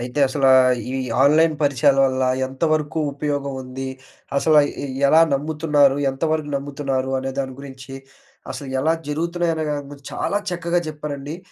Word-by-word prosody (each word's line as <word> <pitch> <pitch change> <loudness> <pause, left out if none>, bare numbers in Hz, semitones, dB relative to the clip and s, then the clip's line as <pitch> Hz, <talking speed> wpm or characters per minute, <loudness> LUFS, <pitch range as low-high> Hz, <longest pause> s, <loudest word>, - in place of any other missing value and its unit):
అయితే, 125 +4 -3
అసలా 135 0 +2 0.4
ఈ - - -3 0.3
ఆన్‌లైన్ 155 +3 +4
పరిచయాల 140 0 +3
వల్ల 130 0 -1 0.2
ఎంతవరకు 155 +3 -1
ఉపయోగం 140 -1 -3
ఉంది? 130 +1 -6 0.5
అసలా 155 +1 +5
ఎ - - -10
ఎ - - -3 0.2
ఎలా 160 +2 +6
నమ్ముతున్నారు, 145 -1 +2
ఎంతవరకు 155 +2 -2
నమ్ముతున్నారు, 135 -2 -3
అనే 135 0 -3
దాని 130 -1 -3
గురించి, 135 -1 -10 0.6
అసలు 140 -2 -7
ఎలా 160 +3 +2 0.2
జరుగుతున్నయన్న 165 +1 -1
దాని 145 -1 -3
గురించి 140 -1 -11
చాలా 205 - -1
చక్కగా 175 0 -1
చెప్పారండి. 150 0 -6
145 Hz, 140 wpm, -21 LUFS, 135-155 Hz, 0.6 s, ఎలా